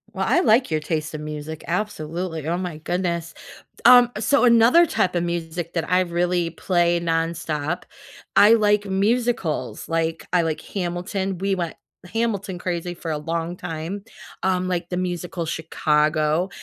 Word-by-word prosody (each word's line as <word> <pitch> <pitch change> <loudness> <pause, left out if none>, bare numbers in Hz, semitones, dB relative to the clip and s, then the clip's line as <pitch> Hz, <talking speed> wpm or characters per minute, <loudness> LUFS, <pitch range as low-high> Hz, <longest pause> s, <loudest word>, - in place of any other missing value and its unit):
Well, 190 -1 -1
I - - +4
like 230 +4 +4
your 155 -1 0
taste 155 0 -3
of 155 - -5
music, 150 +1 -6
absolutely, 170 -4 -3
oh 170 +2 0
my 180 -4 -4
goodness. 170 0 -2 0.4
D - - -17
um, 245 0 +8
so, 285 - +3
another 240 +8 +6
type 190 - 0
of 175 - +1
music 170 0 -4
that 165 -2 -2
I 180 +1 +4
really 175 -1 0
play 175 0 +1
nonstop, 165 -1 -2 0.5
I 210 +2 +8
like 210 -2 +3
musicals, 200 -2 -1
like, 165 0 -1
I 180 - +5
like 160 -2 -2
Hamilton. 185 +1 -3
We 195 +2 0
went 170 -3 -3 0.4
Hamilton-crazy 185 -6 -2
for 165 -1 -5
a 155 - -1
long 165 +2 -3
time. 165 +4 -5 0.4
Um, 185 -1 +1
like 175 -1 -2
the 180 - -2
musical 175 -1 -3
Chicago, 155 +1 +1
175 Hz, 150 wpm, -23 LUFS, 165-190 Hz, 0.5 s, um